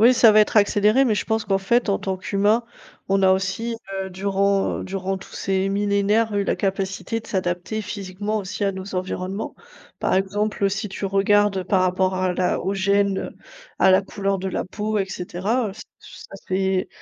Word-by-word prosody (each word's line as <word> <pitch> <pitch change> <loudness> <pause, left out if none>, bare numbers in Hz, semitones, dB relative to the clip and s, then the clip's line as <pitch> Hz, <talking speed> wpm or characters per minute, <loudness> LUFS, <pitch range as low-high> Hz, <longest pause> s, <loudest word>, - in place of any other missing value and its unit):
oui 240 +3 +7
ça 230 -3 +6
va 215 - +7
être 210 - +1
accéléré, 210 +4 +4
mais 230 -5 +2
je - - -2
pense 220 -1 -1
qu'en 195 - +1
fait 235 +5 +1
en 200 - +1
tant 190 -1 -2
qu'humain, 205 +5 +1 0.4
on 195 0 +2
a 190 - +6
aussi, 195 +5 0 0.3
heu, 190 - -6
durant 195 +1 0
durant 190 0 -3
tous - - -13
ces 190 0 0
millénaires 205 +2 +1
eu 200 - +2
la - - 0
capacité 195 +3 -2
de - - -15
s'adapter 185 +2 -2
physiquement 205 +1 -4
aussi 200 +1 -4
à 200 - +1
nos 190 0 -6
environnements. 185 +3 -4 0.5
Par - - +1
exemple, 200 +1 0
si 200 +2 -3
tu 195 - -6
regardes 195 0 +2
par 185 0 +2
rapport 185 +1 +1
à 185 -1 0
la 180 0 +1
aux 195 +2 -2
gènes, 200 0 +1 0.5
à 190 - +5
la 190 +1 +5
couleur 195 -1 -2
de 190 - -2
la - - -2
peau 210 +3 -2
et 195 - +1
cetera, 195 +5 -2
ç 220 - -10 0.2
ç - - -13
ça - - -12
s'est 190 0 0
195 Hz, 195 wpm, -23 LUFS, 190-210 Hz, 0.5 s, oui